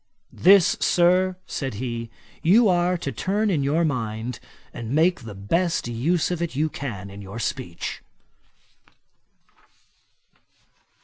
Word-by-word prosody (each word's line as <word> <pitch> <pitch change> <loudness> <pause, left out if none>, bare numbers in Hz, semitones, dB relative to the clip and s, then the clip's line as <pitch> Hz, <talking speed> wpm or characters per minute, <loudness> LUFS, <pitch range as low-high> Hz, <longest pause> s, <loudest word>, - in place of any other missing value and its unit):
'This, 190 0 +5
Sir, 180 +1 +3
(said 135 -6 -4
he,) 115 0 -4 0.3
you 215 +7 +5
are 180 -1 +2
to 140 - -4
turn 200 - 0
in 155 -6 +1
your 150 +5 +1
mind, 115 -3 -3 0.3
and 120 +3 -4
make 170 +3 +3
the 115 -5 -9
best 165 - 0
use 150 +10 0
of 175 -2 -2
it 170 -5 -3
you 155 +3 +1
can 100 -10 -6
in 100 +1 -9
your 100 +3 -8
speech.' 115 -7 -4
145 Hz, 125 wpm, -24 LUFS, 115-175 Hz, 0.3 s, This